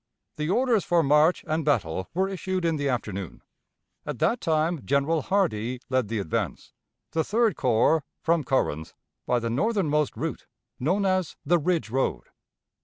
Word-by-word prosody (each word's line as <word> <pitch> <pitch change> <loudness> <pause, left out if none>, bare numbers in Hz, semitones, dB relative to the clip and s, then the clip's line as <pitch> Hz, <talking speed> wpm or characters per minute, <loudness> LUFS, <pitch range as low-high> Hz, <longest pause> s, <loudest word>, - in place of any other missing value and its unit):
The 150 +1 -2
orders 235 -1 +2
for 170 -1 +2
march 150 +4 +3
and 155 +1 0
battle 95 - 0
were 190 +2 +2
issued 185 -1 -3
in 165 -2 +1
the 140 -1 -1
afternoon. 100 -7 -4 0.6
At - - -5
that 180 +10 +1
time 160 -2 0
General 140 +4 +1
Hardee 130 - 0
led 130 -4 +2
the 115 +2 -2
advance, 95 -6 -3 0.4
the 160 - +1
Third 220 -2 +2
Corps, 130 +5 +3 0.2
from 165 -1 +1
Corinth, 80 - -1 0.3
by 125 - +2
the 115 -1 -2
northernmost 150 - +1
route, - - -4 0.3
known 185 +10 +1
as 185 -3 0
the 170 +4 +3
Ridge 160 - 0
road. 135 +2 0
155 Hz, 155 wpm, -26 LUFS, 125-180 Hz, 0.6 s, march